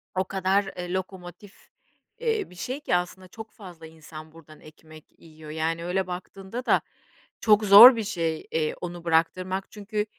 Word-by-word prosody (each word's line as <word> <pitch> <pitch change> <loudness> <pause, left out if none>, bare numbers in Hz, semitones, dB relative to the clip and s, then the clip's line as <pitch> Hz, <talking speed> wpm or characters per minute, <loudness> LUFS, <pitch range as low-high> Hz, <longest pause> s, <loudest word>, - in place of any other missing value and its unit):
o 185 - +1
kadar, 190 +1 0 0.2
ııı, 180 0 -5
lokomotif, 185 +1 -8 0.5
ııı, 450 -3 -1
bir 180 - -16
şey 255 +10 -5
ki 235 - -1
aslında 180 +1 -4
çok 220 +4 -11
fazla 175 -6 -13
insan 155 0 -13
buradan 155 -1 -17
ekmek 155 0 -16
yiyor. 155 -2 -13
Yani, 165 +2 -3
öyle 185 +1 -2
baktığında 190 +6 -8
da - - +3 0.6
çok 215 -1 +4
zor 225 +6 +10
bir 225 - -3
şey, 165 -6 -3
eee, 155 -1 -1
onu 175 -1 -7
bıraktırmak. 185 +4 -1
Çünkü 210 0 -4
180 Hz, 160 wpm, -25 LUFS, 165-200 Hz, 0.6 s, zor